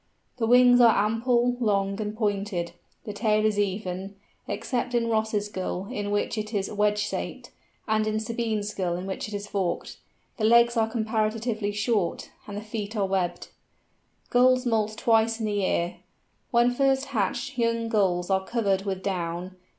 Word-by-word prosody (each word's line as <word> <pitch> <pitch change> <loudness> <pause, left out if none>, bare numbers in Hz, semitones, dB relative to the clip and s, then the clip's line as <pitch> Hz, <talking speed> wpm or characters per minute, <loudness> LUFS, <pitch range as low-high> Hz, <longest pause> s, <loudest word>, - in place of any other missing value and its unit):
The 225 -2 0
wings 245 +1 +6
are 225 -3 +5
ample, 240 +2 +1
long, 200 -2 0
and 210 0 -4
pointed; 200 -5 -1 0.3
the 210 - -6
tail 215 0 +1
is 210 -1 +1
even, 195 -1 -2 0.3
except 245 -1 -2
in 230 -1 +1
Ross's 220 -2 0
Gull 190 -1 -4
in 205 -4 -3
which 205 +2 -1
it 215 +1 -5
is 195 -1 -1
wedge 210 0 +1
shaped, 210 0 -4 0.4
and 215 0 +1
in 215 0 0
Sabine's 220 -2 -2
Gull 180 -4 -1
in 180 +2 -5
which 195 +2 -4
it 210 - -6
is 205 0 -4
forked. 195 -4 -3 0.4
The 220 - -3
legs 235 +2 +5
are 225 -1 +2
comparatively 220 -1 -1
short, 205 -3 -1 0.2
and 205 -1 -6
the - - -4
feet 215 0 -5
are 200 - +2
webbed. 190 -2 -2 0.8
Gulls 255 +1 +4
moult 215 -2 0
twice 225 0 +2
in 220 - -2
the 210 - -1
year. 185 -3 0 0.5
When 240 +1 +4
first 270 +1 +2
hatched 240 +5 -1
young 230 0 +1
Gulls 190 -5 +1
are 190 0 +2
covered 200 -3 0
with 190 -1 -3
down. 180 -1 -3
215 Hz, 165 wpm, -26 LUFS, 200-230 Hz, 0.8 s, wings